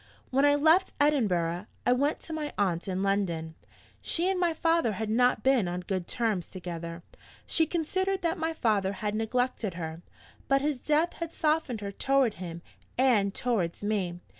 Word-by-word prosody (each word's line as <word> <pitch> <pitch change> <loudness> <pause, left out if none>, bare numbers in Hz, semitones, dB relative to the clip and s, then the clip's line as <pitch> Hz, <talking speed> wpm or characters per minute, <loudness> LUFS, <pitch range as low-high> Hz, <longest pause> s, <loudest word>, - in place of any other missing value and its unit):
'When 270 +2 +4
I 290 0 +5
left 320 +6 +4
Edinburgh, 200 - +1 0.2
I - - +4
went 285 +4 0
to 325 - -7
my 300 -2 -3
aunt 180 -3 0
in 190 0 -1
London. 175 -5 -1 0.5
She 340 +2 0
and 375 - -1
my 350 -2 +3
father 330 -7 +1
had 215 +2 -3
not 245 -1 +3
been 260 -7 +3
on 175 +1 -3
good 185 -1 -3
terms 220 -7 -1
together; 170 -2 -7 0.4
she 320 -1 +2
considered 375 +4 -1
that 330 0 0
my 320 0 0
father 210 -10 +1
had 210 +1 -3
neglected 225 -3 -1
her. 165 -1 -5 0.5
But 275 0 +3
his 295 -3 0
death 310 +5 +1
had 335 -1 -4
softened 305 -9 0
her 200 -1 -4
toward 270 +1 +2
him 170 -1 -6 0.3
and 235 -6 +3
toward 205 -7 -1
me. 195 -5 -1
230 Hz, 170 wpm, -28 LUFS, 185-300 Hz, 0.5 s, I